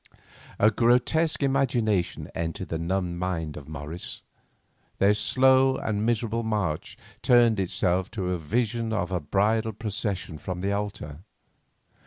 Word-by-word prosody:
A 105 +2 +5
grotesque 125 +8 +2
imagination 120 -8 +1
entered 85 +4 -4
the 80 - -2
numbed 85 0 -2
mind 85 -4 -2
of 75 -1 -9
Morris. 80 +3 -7 0.7
Their 100 +1 +4
slow 130 +4 +4
and 105 -1 -2
miserable 115 0 0
march 105 -9 -2 0.2
turned 120 -4 +5
itself 95 0 0
to 90 -2 -1
a 90 - -1
vision 115 +6 -1
of 95 -4 -1
a 90 - 0
bridal 110 +8 +1
procession 100 -6 -3
from 90 +3 -5
the 100 +1 0
altar. 100 -8 -4
100 Hz, 130 wpm, -26 LUFS, 90-115 Hz, 0.7 s, A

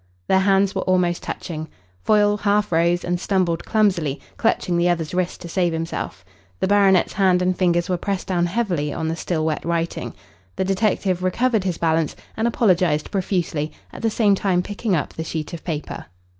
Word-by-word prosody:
Their 190 - +4
hands 195 0 +3
were 190 - -1
almost 180 -2 +1
touching. 160 -2 -5 0.3
Foyle 205 -1 +3
half 205 -1 +1
rose 170 +1 +2
and 175 0 -1
stumbled 180 -4 0
clumsily, 180 -10 +1 0.2
clutching 185 -5 +1
the 170 +1 +3
other's 165 -2 -1
wrist 180 -1 -1
to - - -7
save 175 -1 0
himself. 160 - -4 0.3
The - - +1
baronet's 195 -2 +4
hand 190 -2 +3
and 180 0 +1
fingers 175 -1 +1
were 180 -2 0
pressed 195 +1 -3
down 175 -2 +1
heavily 175 -7 -1
on 160 0 -2
the 165 - -1
still 165 -2 -2
wet 155 -1 -1
writing. 170 0 -2 0.4
The 190 - -1
detective 195 -2 0
recovered 220 +3 +1
his 180 -3 -1
balance 160 -2 +1 0.2
and 220 +1 0
apologised 180 -9 +2
profusely, 175 -6 -1 0.2
at - - -8
the 225 - +2
same 210 -2 +3
time 185 -2 +1
picking 205 0 -1
up 150 - -2
the 160 - -4
sheet 160 -1 -5
of 170 - -7
paper. 155 -4 -5
180 Hz, 185 wpm, -22 LUFS, 165-195 Hz, 0.4 s, Their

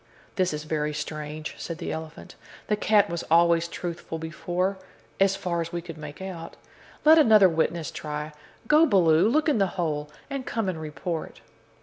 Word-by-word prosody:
"This 185 -1 +1
is 150 -1 -4
very 150 -1 -2
strange," 150 0 -5
said 165 - -5
the 170 - -4
elephant; 160 0 -7 0.4
"the 210 - +3
cat 210 -1 +3
was 170 -3 -3
always 170 0 +4
truthful 170 -1 -5
before 175 +4 -2 0.4
as 195 0 +4
far 170 -3 -2
as 165 0 -5
we 175 - -2
could 165 -2 -9
make 150 +4 -8
out. 175 -4 -7 0.5
Let 320 +1 +8
another 215 -8 +7
witness 165 -1 -1
try. 150 0 -5 0.4
Go, 310 +4 +6
Baloo, 180 - +4
look 305 +6 +2
in 290 -8 +2
the 195 - +3
hole, 150 -4 -1 0.2
and 275 -2 -4
come 225 -4 -2
and 170 -4 -3
report." 160 +2 -5
170 Hz, 170 wpm, -26 LUFS, 155-195 Hz, 0.5 s, Let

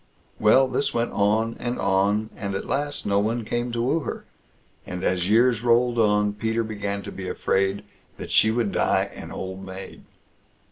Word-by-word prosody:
Well, 120 +5 +5
this 130 +2 -1
went 120 0 0
on 110 +3 +1
and 120 0 -3
on, 100 +3 +1
and 100 -1 -4
at - - -3
last 145 +1 -2
no 100 0 +2
one 110 +2 -1
came 120 +2 -2
to 120 0 -1
woo 145 +7 +1
her, - - -6 0.6
and 90 0 -6
as 90 0 0
years 115 +1 +4
rolled 120 0 +3
on, 105 -1 +3
Peter 110 +2 -1
began 100 -2 -4
to - - -7
be 95 -1 -6
afraid 95 +2 0 0.3
that - - -7
she 110 - +5
would 110 -2 0
die - - +1
an - - -9
old 95 0 -6
maid. 95 0 -9
110 Hz, 180 wpm, -24 LUFS, 100-120 Hz, 0.6 s, Well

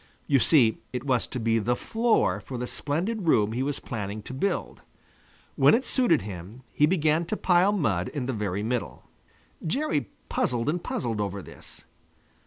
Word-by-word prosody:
You 140 - +3
see, 120 -6 +4
it 125 0 -4
was 130 -4 +1
to 130 - -5
be 115 0 +2
the 120 +3 +1
floor 225 - +1
for 130 - -7
the 125 - -3
splendid 175 - -2
room 105 -8 +4
he 120 +3 -2
was 140 +1 -2
planning 105 -2 -5
to 130 - -8
build. 170 +10 -2 0.7
When - - +6
it 255 +3 -1
suited 240 - +3
him, 100 +5 -8
he 150 - +4
began 160 -2 +2
to 215 - -3
pile 180 +2 +4
mud 105 - 0
in 140 -5 -4
the 130 - -2
very 105 -2 -2
middle. 120 +1 -3 0.6
Jerry 160 - -1 0.2
puzzled 120 +2 0
and 170 +3 -1
puzzled 115 -3 -2
over 100 -1 -3
this. - - -13
130 Hz, 175 wpm, -26 LUFS, 110-165 Hz, 0.7 s, When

